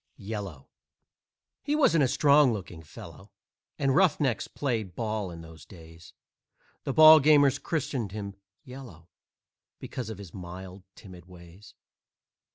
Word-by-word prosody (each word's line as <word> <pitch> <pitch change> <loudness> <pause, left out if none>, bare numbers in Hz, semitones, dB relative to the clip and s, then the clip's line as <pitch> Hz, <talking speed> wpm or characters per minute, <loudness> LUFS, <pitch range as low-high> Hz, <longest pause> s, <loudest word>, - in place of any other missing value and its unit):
"YELLOW" 100 -9 -7 0.9
He 295 +1 -2
wasn't 165 - +3
a - - +3
strong 145 +1 +4
looking 90 -6 -7
fellow, 95 +5 -13 0.5
And 135 -1 0
roughnecks 150 -8 +1
played 110 -10 -4
ball 110 -4 -3
in 85 -1 -10
those 80 -1 -14
days; 80 -2 -15 0.7
The - - -1
ballgamers 150 -3 +6
christened 130 - -3
him 100 -1 -6 0.3
"Yellow" 125 -11 -12 0.7
Because 125 -3 -7
of 110 - -7
his 100 -5 -12
mild, 95 +1 -10
timid 90 -4 -14
ways. 90 +3 -16
105 Hz, 120 wpm, -27 LUFS, 90-140 Hz, 0.9 s, ballgamers